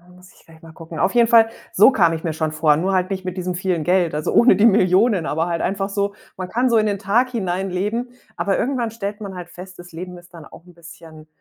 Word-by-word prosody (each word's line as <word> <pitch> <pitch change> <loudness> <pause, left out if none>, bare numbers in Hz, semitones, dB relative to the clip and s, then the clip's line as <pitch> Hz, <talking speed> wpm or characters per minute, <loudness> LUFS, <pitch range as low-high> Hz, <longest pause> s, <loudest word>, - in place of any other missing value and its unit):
muss 180 0 -18
ich - - -24
gleich 160 -1 -19
mal 165 -1 -13
gucken. 165 0 -11
Auf 195 - +1
jeden 235 -1 +4
Fall, 225 -1 +5 0.2
so 210 +8 +6
kam 170 -9 +3
ich 160 - -5
mir 165 - -2
schon 155 0 -3
vor, 155 -2 +2
nur 190 +4 -1
halt 185 0 0
nicht 190 -1 -5
mit 185 0 -4
diesem 180 0 -3
vielen 180 -3 -2
Geld, 175 -3 +1
also 150 - -2
ohne 245 - +5
die 210 - +3
Millionen, 195 -2 +3
aber 160 +1 -1
halt 170 -1 -2
einfach 195 +1 -2
so 200 0 -2 0.2
man 185 - -5
kann 245 +6 0
so 230 - +3
in 215 - +2
den 200 -2 -1
Tag 240 +6 +1
hineinleben, 195 +3 -3 0.3
aber 195 - 0
irgendwann 245 -4 -2
stellt 205 -1 -6
man 195 -3 -8
halt 175 -1 -8
fest, 185 +1 -12
das 175 0 -13
Leben 180 +2 -8
ist 175 0 -17
dann 165 -3 -12
auch 165 - -15
'n 180 - -17
bisschen 160 -2 -14
185 Hz, 260 wpm, -20 LUFS, 170-205 Hz, 0.3 s, so